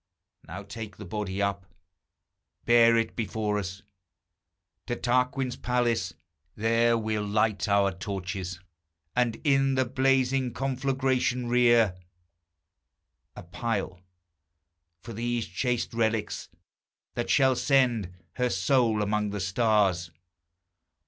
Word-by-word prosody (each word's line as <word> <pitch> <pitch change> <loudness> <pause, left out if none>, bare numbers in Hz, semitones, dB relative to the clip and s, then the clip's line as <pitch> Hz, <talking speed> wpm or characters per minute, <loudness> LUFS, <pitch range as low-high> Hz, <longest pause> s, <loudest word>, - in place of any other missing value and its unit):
Now 95 +5 -7
take 105 0 -8
the 105 - -9
body 100 +1 -3
up. 100 -1 -2 1.0
Bear 115 -1 +6
it 115 -1 -1
before 105 -1 -1
us 95 0 -6 1.0
To 120 - -1
Tarquin's 125 +1 0
palace; 120 -8 0 0.4
there 115 +2 +2
we'll 110 -1 -2
light 105 0 0
our 100 -1 +3
torches, 95 -1 -5 0.6
And 120 -2 +1
in 135 -2 +3
the 130 0 +2
blazing 130 0 +1
conflagration 130 -1 0
rear 120 -6 +4 1.4
A - - -9
pile, 95 -1 -3 1.0
for 115 - -8
these 120 +1 -2
chaste 120 +8 -2
relics, 110 -2 -1 0.6
that 120 - -3
shall 130 -2 +4
send 120 -9 +2 0.3
Her 125 -1 +1
soul 120 -6 +2
amongst 105 0 -1
the 105 - -3
stars. 95 -3 +1
115 Hz, 105 wpm, -27 LUFS, 100-125 Hz, 1.4 s, Bear